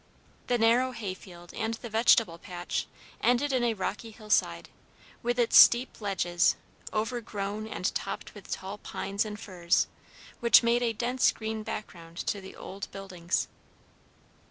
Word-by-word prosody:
The 245 - +2
narrow 240 +3 +3
hay 205 -6 -4
field 175 -2 -13
and 225 0 -2
the 235 - -8
vegetable 220 -6 +4
patch 175 0 -4 0.3
ended 250 +4 +2
in 255 -2 +2
a 235 -2 +1
rocky 205 +3 -4
hillside, 210 - 0 0.5
with 240 +1 -1
its 240 -2 +2
steep 240 -1 +6
ledges, 175 -4 +2 0.4
overgrown 215 -2 -3
and 190 -4 -2
topped 195 - -4
with 205 -3 -13
tall 195 +2 -5
pines 200 +2 -2
and 210 -1 -6
firs, 175 -3 +1 0.5
which 235 -2 +7
made 235 +1 +3
a 235 -1 +2
dense 245 +3 +2
green 220 0 -4
background 170 -6 -7
to 200 - -1
the 190 - -11
old 200 +2 -7
buildings. 185 -3 -2
215 Hz, 145 wpm, -29 LUFS, 190-235 Hz, 0.5 s, which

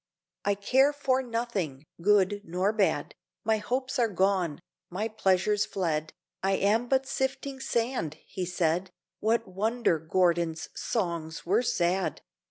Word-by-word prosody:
'I 200 0 +3
care 260 +8 +4
for 265 -2 +1
nothing, 230 - -3 0.2
good 205 +1 +3
nor 185 +4 0
bad, 210 -3 +1 0.3
My 220 -1 +2
hopes 255 +5 -2
are 235 - +4
gone, 190 -5 +1 0.3
my 200 +5 -2
pleasures 205 -1 +2
fled, 160 -6 -1 0.3
I 195 0 +2
am 215 +5 +2
but 265 +1 +2
sifting 265 0 -2
sand,' 235 - -1
he 185 - -4
said: 180 +1 0 0.3
What 230 +1 +1
wonder 210 -1 +1
Gordon's 170 -1 +1
songs 170 -7 -3
were 200 +7 +3
sad! 185 -5 0
200 Hz, 130 wpm, -28 LUFS, 175-230 Hz, 0.3 s, care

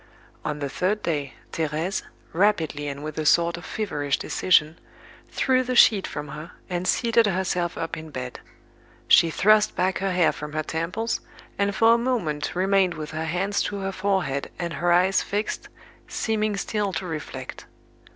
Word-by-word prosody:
On 150 - -2
the 145 -1 -3
third 195 +9 -1
day, 145 -5 -2 0.2
Thérèse, 160 +4 -1 0.3
rapidly 165 -6 +1
and 140 0 -5
with 155 0 -5
a 155 - -2
sort 170 +1 +4
of 170 - -9
feverish 145 -10 -1
decision, 160 -3 +2 0.5
threw 255 -1 +2
the 255 0 -2
sheet 210 -5 +6
from 145 0 -6
her, 150 +4 -8 0.2
and 180 +1 -2
seated 230 +1 +3
herself 180 -2 -1
up 165 0 -3
in 160 0 -8
bed. 125 -3 -6 0.7
She 170 - +6
thrust 215 +5 +4
back 185 +1 +1
her 195 0 0
hair 180 -3 +3
from 150 0 -8
her 155 0 -1
temples, 170 +9 -2 0.4
and 200 0 +1
for 225 +4 +6
a - - +4
moment 175 -14 -1
remained 190 -1 +2
with 155 -1 -6
her 160 0 -3
hands 185 +5 0
to 205 - -3
her 195 0 -2
forehead 185 -8 -1
and 170 -1 -3
her 175 +5 +1
eyes 185 +2 +4
fixed, 210 +2 -3 0.4
seeming 215 -2 -1
still 205 0 -1
to 185 - -3
reflect. 160 -3 -6
175 Hz, 170 wpm, -25 LUFS, 155-200 Hz, 0.7 s, sheet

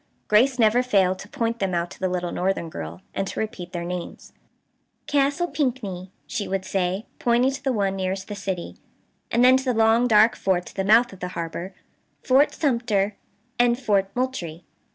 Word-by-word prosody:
Grace 250 +5 +4
never 230 +1 +4
failed 190 -7 +2
to 205 - -10
point 230 0 -2
them 190 -2 -1
out 170 +1 -2
to - - -12
the 185 - 0
little 180 -1 -2
northern 180 -3 -1
girl, 85 - -7
and 195 - -2
to - - -5
repeat 210 -5 -5
their 170 -1 -4
names: 180 0 -6 0.7
"Castle 285 +4 +1
Pinckney," 245 - -3 0.2
she 210 -5 -4
would 195 -1 -2
say, 190 +2 -1
pointing 245 +2 +3
to 275 - -7
the 270 - +1
one 200 -4 0
nearest 190 0 -3
the 210 - -5
city, 195 -3 -5 0.5
and 240 +2 +3
then 255 +1 +7
to 265 - -4
the 250 -2 +1
long 225 +2 +4
dark 215 -1 +5
forts 180 -2 -1
at - - -24
the 195 - -1
mouth 225 +3 +4
of 190 - -13
the 180 - -3
harbor, 170 +3 -5 0.5
"Fort 270 +3 +4
Sumter, 235 -8 0 0.4
and 240 0 +4
Fort 200 -6 +1
Moultrie." 185 -11 -3
205 Hz, 190 wpm, -24 LUFS, 185-245 Hz, 0.7 s, then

